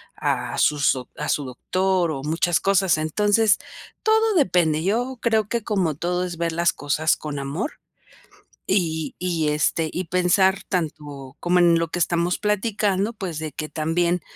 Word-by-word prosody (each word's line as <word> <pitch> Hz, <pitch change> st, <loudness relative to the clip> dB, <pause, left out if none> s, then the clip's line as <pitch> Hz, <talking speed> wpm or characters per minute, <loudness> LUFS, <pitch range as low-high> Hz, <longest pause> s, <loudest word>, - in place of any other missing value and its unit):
a -, -, -2 dB
sus 145 Hz, -2 st, +3 dB
do 130 Hz, -2 st, -7 dB
a -, -, -4 dB
su 145 Hz, -, 0 dB
doctor 185 Hz, +6 st, 0 dB
o 135 Hz, -2 st, -4 dB
muchas 165 Hz, +2 st, +1 dB
cosas. 190 Hz, -4 st, +2 dB
Entonces, 205 Hz, +6 st, +2 dB, 0.5 s
todo 440 Hz, -1 st, +3 dB
depende. 170 Hz, -, +2 dB
Yo 245 Hz, +7 st, -1 dB
creo 220 Hz, -3 st, +1 dB
que 235 Hz, -2 st, -1 dB
como 185 Hz, -9 st, 0 dB
todo, 180 Hz, +3 st, -1 dB
es 175 Hz, -2 st, -6 dB
ver 170 Hz, 0 st, -1 dB
las 170 Hz, 0 st, +2 dB
cosas 150 Hz, +3 st, 0 dB
con 150 Hz, -2 st, -5 dB
amor 145 Hz, -, -4 dB, 0.9 s
y 160 Hz, -5 st, 0 dB
y 170 Hz, -4 st, 0 dB
este 155 Hz, +2 st, 0 dB
y 185 Hz, -, -3 dB
pensar 185 Hz, +2 st, +2 dB
tanto, 145 Hz, -6 st, -4 dB
como 180 Hz, +1 st, +2 dB
en 170 Hz, -1 st, +5 dB
lo 165 Hz, -1 st, -1 dB
que 175 Hz, -, -3 dB
estamos 170 Hz, +1 st, +1 dB
platicando, 210 Hz, 0 st, 0 dB
pues, 185 Hz, -7 st, -5 dB
de 155 Hz, -1 st, -5 dB
que 155 Hz, -, -5 dB
también 170 Hz, +2 st, 0 dB
175 Hz, 165 wpm, -23 LUFS, 155-195 Hz, 0.9 s, en